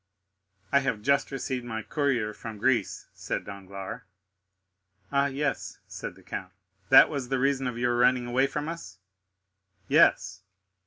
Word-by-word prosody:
"I 140 - +5
have 135 -7 -2
just 140 +2 +2
received 130 -2 -3
my 110 -2 -5
courier 130 -8 0
from 110 0 -8
Greece," 120 +3 0
said - - -4
Danglars. 100 -1 -7 1.1
"Ah, 140 0 +3
yes," 140 +1 -3
said - - -7
the - - -18
count; - - -6 0.4
"that - - +9
was 130 -4 -4
the 135 - +1
reason 135 0 +1
of 120 -2 -4
your 120 0 +1
running 125 0 +3
away 130 +3 +2
from 150 +2 -4
us." 165 -8 -7 0.9
"Yes." - - +3
130 Hz, 145 wpm, -27 LUFS, 115-140 Hz, 1.1 s, that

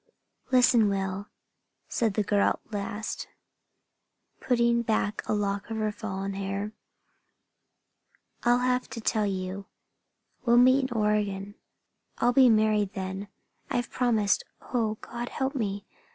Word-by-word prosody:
"Listen, 245 -4 +5
Will," 195 0 -2 0.6
said 225 -4 0
the 215 - +2
girl 205 0 +3
at 225 - -18
last, 205 +1 -4 1.1
putting 235 -1 +2
back 215 -2 0
a - - +2
lock 200 0 -2
of 225 - -3
her 215 -1 0
fallen 195 -2 -4
hair. 195 +1 -3 1.7
"I'll 240 0 +4
have 250 0 0
to 230 - -6
tell 215 -1 +1
you. 190 0 -4 0.8
We'll 240 -1 +4
meet 260 +2 +5
in 240 - -3
Oregon? 205 -2 0 0.6
I'll 245 +1 +2
be 260 -1 +7
married 215 -2 +3
then. 190 +1 -4 0.4
I've 245 -1 -1
promised. 225 -5 +2 0.3
Oh, 225 -3 +1
God 240 +1 -5
help 265 +1 -2
me! 205 -6 -2
215 Hz, 125 wpm, -28 LUFS, 200-240 Hz, 1.7 s, be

